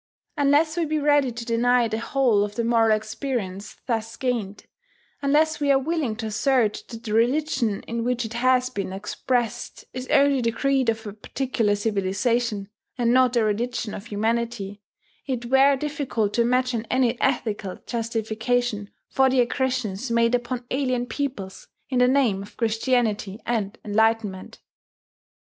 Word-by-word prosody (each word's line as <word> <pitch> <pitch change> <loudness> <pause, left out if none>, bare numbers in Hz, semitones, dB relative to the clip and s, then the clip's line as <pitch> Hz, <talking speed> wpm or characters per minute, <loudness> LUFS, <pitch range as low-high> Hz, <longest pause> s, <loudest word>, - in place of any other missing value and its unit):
Unless 300 +2 +3
we 340 - +1
be 310 0 -1
ready 290 -3 +3
to 235 0 -7
deny 240 +1 +3
the 220 0 -2
whole 230 -4 +2
of 205 0 -5
the 235 - -1
moral 225 -2 +3
experience 215 -3 -5
thus 225 -1 -2
gained, 230 -6 -3 0.6
unless 305 +3 +2
we 285 -1 +2
are 275 - +5
willing 280 -4 -1
to 225 0 -5
assert 220 0 +1
that 230 -1 -9
the 215 -3 -4
religion 235 -2 +1
in 230 0 -3
which 245 0 -1
it 225 - -6
has 255 +1 +2
been 195 -5 -4
expressed 240 +4 -3
is 255 0 -5
only 280 -2 +4
the 230 - +1
creed 270 +1 +1
of 225 0 -2
a 205 - -6
particular 225 -1 -1
civilization, 205 +1 0 0.3
and 240 -1 +2
not 255 -1 +4
a 230 - +4
religion 225 +1 -1
of 205 - -8
humanity, 220 -2 -2 0.5
it 250 -3 -2
were 270 +3 +5
difficult 270 -7 -2
to 235 - +2
imagine 250 -1 +1
any 250 -2 +1
ethical 215 -7 -1
justification 225 -1 -1 0.2
for 265 0 +3
the 260 0 +2
aggressions 250 -3 -1
made 230 0 +2
upon 245 0 -1
alien 255 -2 0
peoples 235 -6 -5 0.2
in 255 -2 +1
the 250 - +5
name 250 -7 +2
of 200 - -12
Christianity 225 -3 0
and 220 -4 -2
enlightenment. 215 -2 0
235 Hz, 155 wpm, -24 LUFS, 220-260 Hz, 0.6 s, are